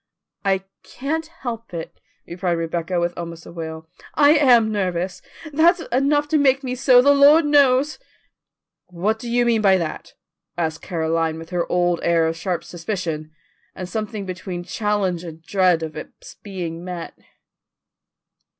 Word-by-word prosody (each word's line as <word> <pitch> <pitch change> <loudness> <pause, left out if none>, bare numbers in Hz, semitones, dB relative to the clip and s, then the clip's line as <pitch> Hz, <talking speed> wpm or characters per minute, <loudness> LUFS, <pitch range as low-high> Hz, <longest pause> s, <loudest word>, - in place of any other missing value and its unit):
"I 195 -1 +1 0.2
can't 315 +5 -4
help 230 - -7
it," 165 - -7 0.3
replied 175 0 -2
Rebecca 170 +1 -2
with 175 0 -1
almost 170 -1 -7
a - - -10
wail. 160 -1 -7 0.3
"I 290 -1 +6
am 245 -8 +5
nervous. 185 -3 -2 0.3
There's 335 +4 +4
enough 285 +4 +2
to 310 - +3
make 270 -1 +3
me 250 -1 -3
so, 255 -1 +5
the 285 - +6
Lord 290 +3 +6
knows." 285 - +3 0.9
"What 195 +5 -1
do 235 - -6
you 240 +1 +2
mean 230 -2 +2
by 195 -2 +5
that?" 165 -3 -5 0.4
asked 160 -2 -2
Caroline 165 -1 -1
with 165 +1 -10
her 175 -1 -2
old 175 -1 +2
air 170 -1 +2
of 160 0 -1
sharp 175 +1 -3
suspicion, 170 -4 -4 0.5
and 185 - -6
something 215 0 -4
between 185 -1 -6
challenge 200 -4 -1
and 165 -2 -10
dread 180 -2 +2
of 155 -1 -6
its 155 - -10
being 175 -4 -6
met. 180 -2 -6
185 Hz, 150 wpm, -21 LUFS, 170-245 Hz, 0.9 s, I